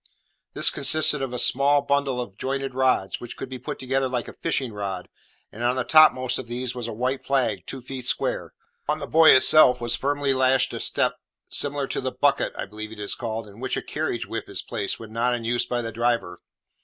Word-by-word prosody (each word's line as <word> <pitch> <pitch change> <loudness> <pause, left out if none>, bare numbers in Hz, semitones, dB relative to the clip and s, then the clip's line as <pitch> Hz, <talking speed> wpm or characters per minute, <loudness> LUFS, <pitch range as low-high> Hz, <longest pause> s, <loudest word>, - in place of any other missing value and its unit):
This - - +4
consisted 150 +1 +2
of 135 -2 -3
a 125 - -4
small 140 +3 +3
bundle 140 -2 0
of 120 -6 -6
jointed 135 +3 -3
rods, 130 -7 +1
which 120 - -8
could 130 - -6
be 130 -1 -7
put 125 - -6
together 135 0 -1
like 125 -2 -2
a - - -8
fishing 135 -8 -2
rod, 100 -3 -4 0.4
and 110 - -10
on 120 +1 +2
the 130 - 0
topmost 130 -4 +5
of 130 - -7
these 125 +1 -3
was 120 -2 -5
a - - -4
white 125 +4 -2
flag 120 -9 0
two 135 - -5
feet 130 0 -7
square. - - -1 0.4
On 150 - +2
the 150 - -5
buoy 160 +2 +7
itself 130 -1 +6
was 120 0 -1
firmly 145 0 0
lashed 130 0 +2
a - - -4
step - - 0 0.3
similar 145 -1 0
to - - -3
the 130 0 -2
"bucket" 140 +3 +1
(I - - -3
believe 110 +2 -8
it 110 - -10
is 105 - -2
called) 115 -2 -5
in 100 +2 -14
which 130 0 -2
a - - -2
carriage - - -3
whip - - -6
is - - -5
placed 100 -1 -3
when 110 -1 -10
not 120 +2 +1
in 120 - -6
use 120 +1 0
by 120 -1 -2
the 115 - -4
driver. 115 -6 -1
125 Hz, 225 wpm, -24 LUFS, 115-135 Hz, 0.4 s, buoy